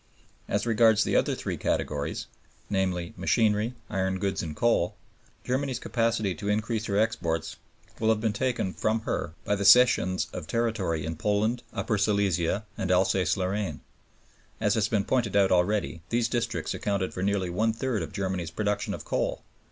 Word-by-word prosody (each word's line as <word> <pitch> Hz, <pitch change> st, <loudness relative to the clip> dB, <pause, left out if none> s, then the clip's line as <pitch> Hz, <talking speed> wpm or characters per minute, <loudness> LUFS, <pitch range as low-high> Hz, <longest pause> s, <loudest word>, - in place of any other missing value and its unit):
As -, -, 0 dB
regards 110 Hz, -1 st, +4 dB
the -, -, 0 dB
other -, -, +2 dB
three -, -, -4 dB
categories, 70 Hz, -1 st, -2 dB, 0.5 s
namely, 90 Hz, -3 st, -1 dB
machinery, 105 Hz, +4 st, +1 dB
iron 95 Hz, -1 st, -1 dB
goods, 100 Hz, 0 st, -1 dB
and 80 Hz, -3 st, -5 dB
coal, 115 Hz, -3 st, +2 dB, 0.5 s
Germany's 130 Hz, 0 st, -1 dB
capacity 115 Hz, -5 st, 0 dB
to 100 Hz, +5 st, -5 dB
increase 110 Hz, +1 st, 0 dB
her 100 Hz, -3 st, -1 dB
exports 85 Hz, -7 st, -1 dB, 0.4 s
will 110 Hz, -, +2 dB
have 110 Hz, -1 st, +3 dB
been 110 Hz, -1 st, 0 dB
taken 120 Hz, -4 st, -1 dB
from 110 Hz, +1 st, 0 dB
her 80 Hz, -, -3 dB
by -, -, +1 dB
the 100 Hz, 0 st, -1 dB
cessions 100 Hz, -3 st, +5 dB
of 90 Hz, -4 st, -6 dB
territory 100 Hz, -8 st, -1 dB
in 80 Hz, 0 st, -4 dB
Poland, 105 Hz, +6 st, +1 dB
Upper 110 Hz, -2 st, -1 dB
Silesia, 100 Hz, -1 st, +1 dB
and 95 Hz, -, -1 dB
Alsace 95 Hz, -1 st, +2 dB
Lorraine. 95 Hz, -4 st, -2 dB, 0.8 s
As -, -, +2 dB
has -, -, +2 dB
been 105 Hz, -3 st, 0 dB
pointed 120 Hz, -6 st, 0 dB
out 100 Hz, -1 st, +4 dB
already, 90 Hz, -1 st, +1 dB
these 120 Hz, 0 st, +1 dB
districts 115 Hz, -9 st, -2 dB
accounted 100 Hz, -2 st, -2 dB
for 90 Hz, -, -4 dB
nearly 95 Hz, -2 st, 0 dB
one 110 Hz, +5 st, +1 dB
third 115 Hz, 0 st, -2 dB
of -, -, -5 dB
Germany's 95 Hz, -3 st, -2 dB
production 105 Hz, +3 st, -1 dB
of -, -, -10 dB
coal. -, -, -1 dB
100 Hz, 165 wpm, -27 LUFS, 95-110 Hz, 0.8 s, cessions